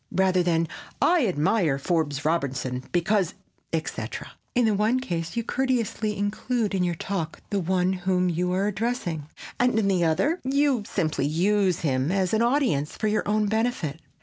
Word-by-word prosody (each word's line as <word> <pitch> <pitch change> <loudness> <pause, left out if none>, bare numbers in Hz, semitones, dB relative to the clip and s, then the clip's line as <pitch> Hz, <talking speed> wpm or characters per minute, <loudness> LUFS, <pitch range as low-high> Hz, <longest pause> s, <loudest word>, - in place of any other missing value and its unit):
rather 185 -1 +3
than 165 -1 +1 0.3
"I 340 -9 +4
admire 160 -2 +2
Forbes 145 -2 -1
Robertson 130 -5 -1
because, 180 +1 +1 0.4
etc." 130 -8 -4 0.2
In 245 -1 +4
the 220 - +3
one 215 +5 +2
case, 170 -6 -4
you 235 - +1
courteously 230 -4 -1
include 210 +2 -1
in 190 -2 +1
your 175 -1 0
talk 170 -2 -4
the 200 - +1
one 185 +1 +1
whom 180 0 +1
you 180 +1 0
are 190 +2 +1
addressing, 205 - -2 0.3
and, 245 -2 +3
in 215 -3 +2
the 185 -3 +2
other, 190 - +2
you 275 -2 +2
simply 155 -6 0
use 185 +3 +2
him 135 0 0
as 190 -1 +1
an 220 - +3
audience 235 - +1
for 215 - 0
your 215 0 0
own 210 +1 +2
benefit. 220 - -1
190 Hz, 165 wpm, -25 LUFS, 165-220 Hz, 0.4 s, I